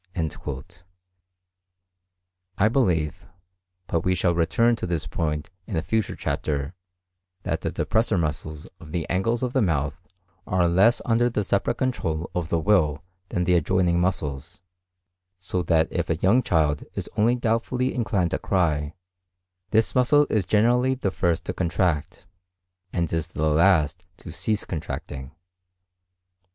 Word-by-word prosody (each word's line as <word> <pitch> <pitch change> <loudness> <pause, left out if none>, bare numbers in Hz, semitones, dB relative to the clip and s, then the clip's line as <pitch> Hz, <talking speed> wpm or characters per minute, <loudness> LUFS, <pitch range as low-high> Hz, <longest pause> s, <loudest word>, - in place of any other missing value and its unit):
I 105 - +4
believe, 90 - 0 0.6
but 85 - 0
we 90 0 +2
shall 90 -1 +2
return 115 +8 +2
to - - -4
this 85 -3 -2
point 75 0 -3 0.2
in 105 - -4
a 80 - 0
future 110 +2 -1
chapter, 70 +1 -2 0.7
that - - -2
the - - -1
depressor 110 -3 +1
muscles 75 -1 -3
of 80 -2 -12
the 85 -4 -2
angles 115 +7 0
of 125 0 -1
the 130 - +3
mouth 80 -2 0 0.5
are 90 -2 +2
less 95 +8 +4
under 120 +1 +3
the 105 -3 -1
separate 100 +5 0
control 85 - -2
of 85 -2 -2
the 85 - +1
will 80 -4 +2 0.3
than 90 - -1
the 90 +1 +2
adjoining 90 +1 +2
muscles; 90 0 -3 0.7
so 90 0 -2
that 80 -2 +2
if 85 -1 -2
a 80 - +2
young 100 +10 +3
child 75 - +1
is - - -4
only 115 +4 +3
doubtfully 125 +2 0
inclined 95 -7 0
to - - -1
cry, 75 -6 0 0.7
this 110 0 +2
muscle 145 +4 +4
is 105 -4 +1
generally 125 +5 +3
the 100 -7 -2
first 85 -3 0
to - - -3
contract, 85 -2 -1 0.7
and 85 -2 -1
is 80 -1 -1
the 80 - -1
last 80 0 +3
to - - -10
cease 105 +5 -1
contracting. 70 -5 -5
90 Hz, 140 wpm, -25 LUFS, 80-110 Hz, 0.7 s, I